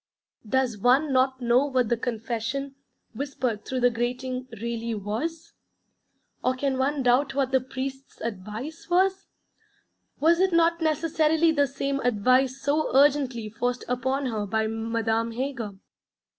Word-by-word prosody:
Does 255 Hz, -4 st, +1 dB
one 265 Hz, +6 st, +3 dB
not 260 Hz, 0 st, +2 dB
know 245 Hz, +4 st, +3 dB
what 255 Hz, -5 st, +1 dB
the 235 Hz, -, +3 dB
'Confession,' 235 Hz, +4 st, -3 dB, 0.4 s
whispered 250 Hz, -4 st, -3 dB
through 260 Hz, -1 st, -3 dB
the 245 Hz, 0 st, +4 dB
grating, 250 Hz, +2 st, -3 dB
really 230 Hz, 0 st, -3 dB
was? 260 Hz, +12 st, -4 dB, 0.9 s
Or 255 Hz, +1 st, +2 dB
can 265 Hz, 0 st, -1 dB
one 275 Hz, +1 st, 0 dB
doubt 265 Hz, +3 st, +3 dB
what 270 Hz, -2 st, +1 dB
the 265 Hz, -1 st, +3 dB
Priest's 265 Hz, +1 st, -6 dB
advice 230 Hz, -, -6 dB
was? 380 Hz, +2 st, +2 dB, 0.9 s
Was 335 Hz, +3 st, +4 dB
it 375 Hz, -1 st, +3 dB
not 335 Hz, 0 st, +3 dB
necessarily 320 Hz, +1 st, +2 dB
the 285 Hz, -3 st, +2 dB
same 275 Hz, +1 st, -2 dB
advice 255 Hz, +3 st, +2 dB
so 290 Hz, +3 st, 0 dB
urgently 270 Hz, -5 st, +3 dB
forced 245 Hz, +3 st, -2 dB
upon 260 Hz, +3 st, -1 dB
her 215 Hz, -4 st, -2 dB
by 220 Hz, +2 st, 0 dB
Madame 225 Hz, +1 st, -1 dB
Heger? 245 Hz, -4 st, -3 dB
260 Hz, 135 wpm, -26 LUFS, 235-280 Hz, 0.9 s, the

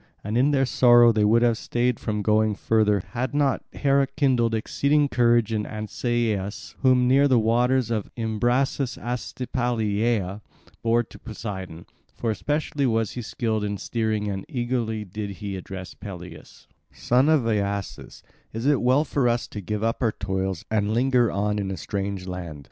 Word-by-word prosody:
And 105 Hz, +2 st, -3 dB
in 130 Hz, +4 st, +4 dB
their 135 Hz, -2 st, +2 dB
sorrow 120 Hz, -2 st, +6 dB
they 110 Hz, -1 st, +1 dB
would 115 Hz, +3 st, +4 dB
have 115 Hz, -2 st, +2 dB
stayed 120 Hz, 0 st, 0 dB
from 105 Hz, -1 st, -2 dB
going 110 Hz, 0 st, +2 dB
further 105 Hz, -2 st, +2 dB
had 130 Hz, +3 st, -3 dB
not 140 Hz, -2 st, +1 dB
Hera 140 Hz, -1 st, +2 dB
kindled 130 Hz, -5 st, +1 dB
exceeding 140 Hz, +6 st, +1 dB
courage 120 Hz, -3 st, +3 dB
in 105 Hz, -1 st, 0 dB
Ancaeus, 110 Hz, -1 st, -2 dB
whom 130 Hz, -2 st, +4 dB
near 135 Hz, +3 st, +5 dB
the 130 Hz, -3 st, +4 dB
waters 120 Hz, +2 st, +2 dB
of 110 Hz, -3 st, -2 dB
Imbrasus 120 Hz, +4 st, 0 dB
Astypalaea 115 Hz, -4 st, -2 dB, 0.4 s
bore 115 Hz, +1 st, +2 dB
to -, -, -15 dB
Poseidon; 95 Hz, -7 st, -7 dB, 0.3 s
for 115 Hz, -, -1 dB
especially 145 Hz, +3 st, -1 dB
was 115 Hz, -2 st, 0 dB
he 125 Hz, -, -5 dB
skilled 110 Hz, -1 st, -2 dB
in 105 Hz, 0 st, -2 dB
steering 110 Hz, 0 st, -2 dB
and 95 Hz, -1 st, -3 dB
eagerly 120 Hz, -4 st, -2 dB
did 105 Hz, +2 st, -5 dB
he 100 Hz, -2 st, -5 dB
address 95 Hz, 0 st, -7 dB
Peleus: 90 Hz, -3 st, -10 dB, 0.3 s
"Son 130 Hz, +5 st, +2 dB
of 155 Hz, -6 st, +3 dB
Aeacus, 100 Hz, -3 st, -3 dB, 0.3 s
is 115 Hz, +3 st, -4 dB
it 145 Hz, -1 st, +3 dB
well 130 Hz, +5 st, +3 dB
for 135 Hz, -4 st, +1 dB
us 120 Hz, 0 st, -1 dB
to 105 Hz, -, -6 dB
give 105 Hz, +2 st, -3 dB
up 115 Hz, +3 st, -1 dB
our 115 Hz, -4 st, +1 dB
toils 95 Hz, -2 st, -3 dB
and 105 Hz, 0 st, +1 dB
linger 125 Hz, -1 st, +3 dB
on 105 Hz, +1 st, -1 dB
in 100 Hz, -1 st, -2 dB
a 95 Hz, -, -4 dB
strange 100 Hz, -2 st, -4 dB
land? 90 Hz, -5 st, -6 dB
115 Hz, 165 wpm, -24 LUFS, 105-125 Hz, 0.4 s, sorrow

